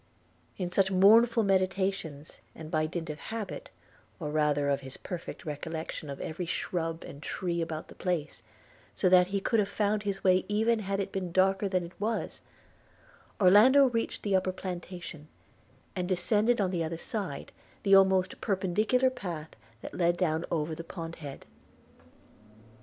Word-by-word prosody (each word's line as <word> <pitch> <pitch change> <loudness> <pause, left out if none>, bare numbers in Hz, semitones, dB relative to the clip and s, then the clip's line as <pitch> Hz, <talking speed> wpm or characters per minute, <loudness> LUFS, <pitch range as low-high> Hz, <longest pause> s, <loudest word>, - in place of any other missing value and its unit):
In 180 -2 -3
such 190 +1 +3
mournful 225 +5 +6
meditations, 190 -5 -1 0.2
and 160 0 -9
by 155 -2 +1
dint 165 -1 -4
of 150 - -9
habit, 220 -3 -6 0.5
or 150 -4 -4
rather 150 -2 +2
of 140 -1 +1
his 130 -1 -8
perfect 180 -3 -7
recollection 160 0 -5
of 140 - -6
every 170 +2 -4
shrub 165 -1 -2
and 140 - -10
tree 170 0 -2
about 160 -1 -4
the - - -12
place, 170 -5 -2 0.5
so 185 - +2
that 180 0 +6
he 200 +1 -1
could 225 +3 +1
have 200 -1 +1
found 210 0 0
his 200 -2 -3
way 185 -1 +4
even 220 +2 +2
had 200 -1 -2
it 195 - -2
been 185 -2 -3
darker 195 +2 +2
than 185 -2 0
it 170 +1 -9
was, 220 +1 -2 1.0
Orlando 235 +9 +7
reached 230 -1 -2
the 200 -2 +1
upper 185 0 +1
plantation, 175 -4 -7 0.7
and 180 -1 -2
descended 210 +6 +2
on 190 -3 +1
the 170 -3 -1
other 165 +1 -3
side, 195 -5 -5 0.3
the 195 - +3
almost 190 -1 +4
perpendicular 215 +7 +1
path 170 -9 -6 0.3
that - - -8
led 175 -1 +1
down 165 -2 0
over 160 -1 -1
the 165 +1 -6
pond 165 -1 -7
head. 145 -4 -9
185 Hz, 160 wpm, -29 LUFS, 165-200 Hz, 1.0 s, Orlando